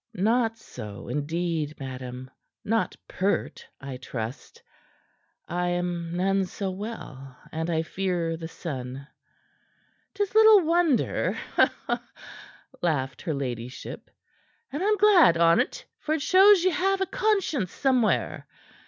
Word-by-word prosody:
"Not 225 +3 +1
so, 105 - -9
indeed, 155 0 -2
madam. 130 -1 -7 0.3
Not 225 +2 0
pert, 195 +2 -2
I 135 -2 -7
trust. 125 -1 -7 0.8
I 180 +1 -1
am 175 -1 -2
none 195 +1 +2
so 190 +1 -4
well, 150 - -8
and 160 +2 -3
I 160 -1 +1
fear 175 -2 -2
the 165 0 -6
sun." 135 -5 -6 1.1
"'Tis 405 -1 -1
little 435 -2 +8
wonder," 330 -5 +1 1.4
laughed 135 -6 -1
her 160 -5 -2
ladyship; 125 -2 -6 0.6
"and 290 - -3
I'm 420 +2 +2
glad 375 - +6
on't, 170 - +2
for 310 - -1
it 300 - -3
shows 385 +1 +6
ye 370 - +3
have 385 +3 +1
a - - +3
conscience 390 - 0
somewhere. 255 -5 +1
180 Hz, 115 wpm, -26 LUFS, -, 1.4 s, little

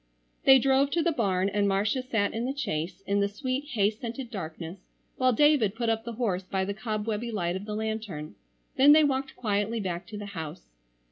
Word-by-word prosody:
They 265 0 +9
drove 270 +2 +3
to 335 - +2
the 340 - +2
barn 195 - +1
and 200 0 +1
Marcia 200 +6 +1
sat 225 -5 0
in 230 +2 -2
the 270 +2 -3
chaise 175 - -3
in 200 +1 +1
the 200 - +2
sweet 255 +6 -3
hay 205 -2 +3
scented 235 +3 -7
darkness 170 -1 -6 0.4
while 255 0 +3
David 255 -5 +4
put 230 0 -1
up 225 0 0
the 235 - -5
horse 215 -6 -1
by 190 0 -2
the 200 - -2
cobwebby 215 +1 -3
light 175 -5 -1
of 190 +2 -5
the 210 -1 -4
lantern; 215 -8 -4 0.4
then 280 +3 +8
they 310 0 +6
walked 270 -2 0
quietly 210 0 -1
back 180 -3 -4
to 210 - -7
the 205 - -6
house. 150 - -7
215 Hz, 205 wpm, -28 LUFS, 195-255 Hz, 0.4 s, They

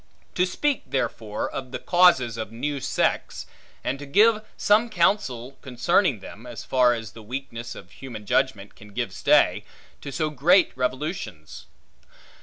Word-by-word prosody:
To 180 +1 +2
speak, 290 +9 0
therefore, 110 -5 -2
of 130 -2 -6
the 130 - -3
causes 170 -8 +4
of 110 -2 -5
new 140 +5 -3
sects; - - -1 0.4
and 135 - -2
to 145 - -8
give 215 +8 +4
some 220 +3 +3
counsel 155 - 0
concerning 130 - +1
them, 115 +5 -11
as 120 -2 -7
far 125 -2 +3
as 115 -1 -7
the 115 - -12
weakness 120 0 -6
of 90 - -12
human 115 -6 -9
judgment 105 -4 0
can 105 -1 -15
give - - -3
stay, - - +3 0.4
to 140 - -7
so 155 +1 -1
great 170 +7 +4
revolutions. 125 - -4
130 Hz, 150 wpm, -25 LUFS, 115-170 Hz, 0.4 s, causes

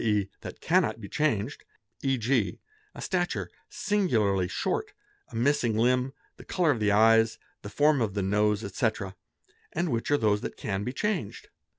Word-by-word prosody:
e., 105 -3 +1
that - - -9
cannot - - +2
be 105 - -8
changed, 115 -9 -1 0.4
e.g., 130 -4 +1 0.4
a - - -8
stature 175 -2 -1 0.2
singularly 110 - +1
short, 195 - -2 0.3
a 120 - -12
missing 120 -2 +2
limb, 125 +3 +2 0.3
the - - -12
colour 175 -4 +2
of 120 - -1
the 105 -1 +2
eyes, 115 +1 +5 0.2
the 100 - -7
form 145 +3 +3
of 105 -3 -1
the 100 - 0
nose, 105 +2 +1
etc., 100 -1 -2 0.6
and 170 +2 0
which 115 -1 -1
are 145 - +4
those 105 -4 +2
that - - -6
can 100 -2 -3
be 125 - -2
changed. 180 - -3
115 Hz, 165 wpm, -28 LUFS, 105-145 Hz, 0.6 s, eyes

